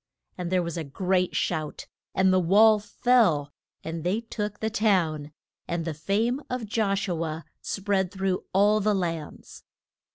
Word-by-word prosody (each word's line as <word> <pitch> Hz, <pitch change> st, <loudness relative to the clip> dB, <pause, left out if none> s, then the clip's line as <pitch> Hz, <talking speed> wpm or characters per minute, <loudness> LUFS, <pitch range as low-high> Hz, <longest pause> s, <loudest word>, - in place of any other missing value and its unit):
and 180 Hz, -1 st, -4 dB
there 185 Hz, -1 st, +2 dB
was 170 Hz, 0 st, -4 dB
a 165 Hz, -, -2 dB
great 180 Hz, +5 st, 0 dB
shout 155 Hz, -3 st, -2 dB, 0.3 s
and 190 Hz, 0 st, +4 dB
the 185 Hz, -, +4 dB
wall 210 Hz, +5 st, +5 dB
fell, 205 Hz, -, +2 dB, 0.3 s
and 165 Hz, 0 st, -5 dB
they 185 Hz, +5 st, +1 dB
took 210 Hz, -3 st, -5 dB
the 220 Hz, 0 st, -2 dB
town; 170 Hz, -9 st, +1 dB, 0.4 s
and 170 Hz, -1 st, -2 dB
the 165 Hz, -, -2 dB
fame 220 Hz, -, 0 dB
of 250 Hz, -2 st, -3 dB
Josh 200 Hz, -2 st, 0 dB
u 170 Hz, -3 st, -1 dB
a 160 Hz, 0 st, -5 dB, 0.2 s
spread 195 Hz, -2 st, -1 dB
through 190 Hz, -2 st, -1 dB
all 205 Hz, +2 st, +4 dB
the 210 Hz, 0 st, +2 dB
lands. 165 Hz, -5 st, -5 dB
190 Hz, 160 wpm, -26 LUFS, 165-210 Hz, 0.4 s, wall